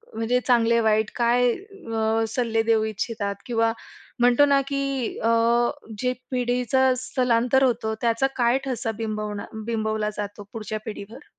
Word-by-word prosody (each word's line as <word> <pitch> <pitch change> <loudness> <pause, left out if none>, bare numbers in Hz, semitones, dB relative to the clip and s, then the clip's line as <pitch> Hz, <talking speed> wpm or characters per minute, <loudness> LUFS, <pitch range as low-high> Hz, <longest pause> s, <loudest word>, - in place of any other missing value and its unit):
म्हणजे 225 +3 +1
चांगले-वाईट 225 -3 +3
काय 240 +1 +3
अ, 225 - -2
सल्ले 225 -2 0
देऊ 225 -1 +2
इच्छितात? 215 -1 -3
किंवा 230 -2 +1 0.5
म्हणतो 245 +4 +5
ना, 280 -1 +3
की 275 -3 -2
अ, - - +2 0.7
जे 250 0 0 0.2
पिढीचं 250 +1 +2
स्थलांतर 250 0 +1
होतं, 230 -3 +1
त्याचा 235 +3 +2
काय 240 +1 +3
ठसा 245 -4 -2
बिंबवणा 210 -2 -4 0.2
बिंबवला 220 -2 -1
जातो 205 0 -5
पुढच्या 215 -1 -4
पिढीवर? 220 +4 -8
230 Hz, 125 wpm, -24 LUFS, 220-250 Hz, 0.7 s, म्हणतो